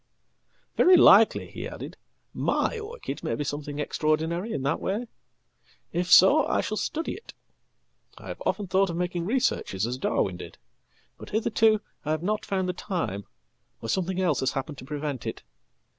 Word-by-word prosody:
"Very 365 0 +7
likely," 220 -8 +6
he - - -6
added, - - -8 0.4
"my 465 - 0
orchid 450 +3 -7
may - - -1
be 150 - -2
something 145 0 -5
extraordinaryin 160 - -1
that 140 +3 0
way. 210 +6 -2 0.9
If 180 +1 -1
so 280 +11 +8
I - - +1
shall 215 - -3
study 325 +8 -2
it. 455 - -12 0.8
I - - -12
have - - -7
often 205 - -1
thought 190 +1 +2
of 170 - -3
makingresearches 180 - -1
as 125 +2 -4
Darwin 95 -8 0
did. - - -10 0.6
But - - -10
hitherto 220 0 +2 0.2
I 150 - -5
have 155 +1 -1
not 210 +3 -1
found 190 -2 -1
the 180 - -1
time, 165 - -3 0.6
orsomething 180 +10 -1
else 175 -6 +1
has 130 - 0
happened 135 0 -4
to - - -10
prevent 145 -3 -4
it. - - -5
180 Hz, 160 wpm, -26 LUFS, 145-215 Hz, 0.9 s, so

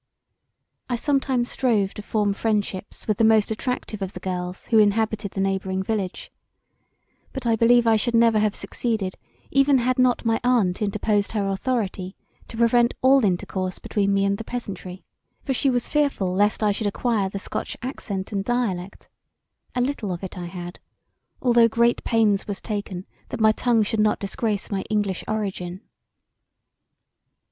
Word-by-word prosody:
I 245 - +1
sometimes 265 -2 0
strove 215 -7 +1
to - - -7
form 210 -1 0
friendships 205 -2 -2
with 215 -3 +1
the - - +4
most 220 -1 +4
attractive 220 -2 -3
of 195 0 -4
the - - -7
girls 180 0 -4
who 225 - +4
inhabited 210 -1 +1
the 195 - -2
neighbouring 190 -1 -1
village; 195 -3 -3 1.0
but 265 -3 -6
I 230 -1 +3
believe 235 +1 +4
I 225 -1 +5
should 235 +2 0
never 230 -2 +5
have 210 -1 +1
succeeded 215 -6 -2 0.4
[even] 275 +1 +4
had 255 +1 0
not 250 -1 +3
my 225 0 +2
aunt 225 -8 +2
interposed 205 0 0
her 205 -3 0
authority 195 -2 -2 0.3
to 225 - -9
prevent 235 +1 +3
all 265 0 +6
intercourse 185 -1 -1
between 200 -1 -1
me 195 0 +2
and 200 +1 0
the - - -4
peasantry; 190 -6 -6 0.4
for 270 - -1
she 275 +2 +2
was 245 -2 +1
fearful 280 -11 0
lest 205 +3 +2
I 210 - +4
should 205 +1 -1
acquire 205 -1 0
the 200 - -5
scotch 195 - -4
accent 200 -7 -4
and 200 -2 -1
dialect; 200 -6 -2 0.7
a 250 - +1
little 245 -6 -2
of 175 +1 -5
it 190 - -6
I 180 -2 -5
had, 175 0 -8 0.6
although 240 -2 +5
great 235 +1 +2
pains 215 -4 +2
was 205 -2 -3
taken 200 -4 -5 0.2
that - - -5
my 220 0 +5
tongue 230 0 +2
should 220 +1 -1
not 210 0 +3
disgrace 205 +1 -2
my 195 -1 -1
English 205 -4 -1
origin. 190 -4 -3
215 Hz, 165 wpm, -24 LUFS, 195-235 Hz, 1.0 s, all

